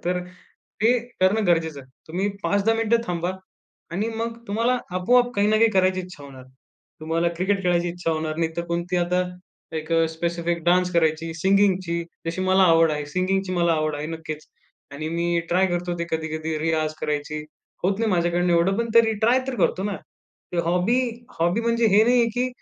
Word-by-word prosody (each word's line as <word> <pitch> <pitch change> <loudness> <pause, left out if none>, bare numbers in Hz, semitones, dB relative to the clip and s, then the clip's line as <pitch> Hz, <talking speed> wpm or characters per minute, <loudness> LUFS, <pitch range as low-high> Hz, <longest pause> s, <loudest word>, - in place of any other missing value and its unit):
तर 180 +1 0 0.6
ते 245 +2 +4 0.2
करणं 200 +2 +3
गरजेचं 160 -4 +1
आहे. 130 - -17 0.2
तुम्ही 185 +5 -1
5-10 205 +3 +2
मिनिटं 225 +1 +2
थांबा 175 0 -2 0.6
आणि 205 +6 -1
मग 230 0 -3
तुम्हाला 230 +5 +1 0.2
आपोआप 245 +6 +3
काही 200 +1 +2
ना 215 - +3
काही 230 +1 +5
करायची 185 -1 +2
इच्छा 180 -5 -10
होणार. 130 -2 -12 0.6
तुम्हाला 165 +2 0
क्रिकेट 195 +3 0
खेळायची 175 -1 +1
इच्छा 175 -1 -3
होणार, 155 -1 -2
नाही 165 0 0
तर 170 - -2
कोणती 170 +1 -2
आता 180 +1 +1 0.5
एक 160 +1 -4 0.2
स्पेसिफिक 170 +1 -2
डान्स 180 +1 +3
करायची, 165 -1 +1
सिंगिंगची, 185 -1 +2 0.2
जशी 165 +3 -3
मला 190 +1 +4
आवड 165 -2 +5
आहे 150 -1 -3
सिंगिंगची 185 +3 -1
मला 170 -1 +2
आवड 155 -1 0
आहे, 150 +1 -4
नक्कीच. 155 -1 -6 0.5
आणि 155 +2 -5
मी 170 +1 0
ट्राय 185 +2 +3
करतो 175 0 -2
ते 170 - -1
कधी-कधी 160 0 -3
रियाज 155 0 0
करायची, 150 0 -3 0.4
होत 195 +2 +1
नाही 225 -1 +1
माझ्याकडून 175 0 +1
एवढं, 170 +3 +3
पण 235 0 -1
तरी 230 -1 +6
ट्राय 245 +3 +5
तर 265 - -2
करतो 190 0 +1
ना. 205 -2 -2 0.6
ते 175 - -1
हॉबी 180 +8 +2 0.4
हॉबी 175 +6 +1
म्हणजे 235 0 +2
हे 215 - +7
नाहीये, 240 0 +4
की 250 +1 0
175 Hz, 180 wpm, -23 LUFS, 165-200 Hz, 0.6 s, हे